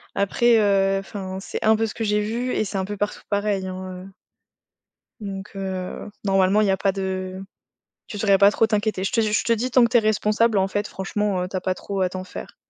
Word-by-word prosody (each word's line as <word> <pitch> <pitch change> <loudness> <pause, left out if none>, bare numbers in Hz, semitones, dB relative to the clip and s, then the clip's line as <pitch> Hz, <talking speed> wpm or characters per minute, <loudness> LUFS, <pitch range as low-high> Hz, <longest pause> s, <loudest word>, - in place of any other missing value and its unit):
Après, 230 +4 +3
heu, 195 -2 +3
enfin, 190 -1 -6
c'est - - -5
un 220 0 +6
peu 225 - +1
ce 215 - -5
que 230 - -4
j'ai 210 0 +1
vu 235 +4 -2
et - - 0
c'est 200 - -4
un 190 - -1
peu 205 +1 -5
partout 205 +1 -3
pareil, 205 -2 0
hein, 185 0 -7
heu - - -11 1.1
Donc, 195 0 -6
heu, 190 0 -5 0.2
normalement, 195 +1 +3
il 210 - +2
y - - +3
a 190 - +1
pas 195 - +1
de 190 -1 -4 0.7
tu 210 - -7
devrais 200 -1 +4
pas 200 +1 +8
trop 225 - +3
t'inquiéter. 210 -3 0
Je 195 - -1
te 230 - +2
je 215 -1 +1
te 230 - +2
dis 245 +3 -2
tant 250 0 +6
que - - 0
tu 240 - +4
es - - +7
responsable, 215 +1 +2
en 190 0 +3
fait 205 +2 -2
franchement, 195 0 -2
heu, - - -3
tu 190 - -8
as 185 - -1
pas 185 - -1
trop 195 0 -4
à 185 - +2
t'en 185 0 -6
faire. 185 - -9
200 Hz, 245 wpm, -23 LUFS, 190-215 Hz, 1.1 s, pas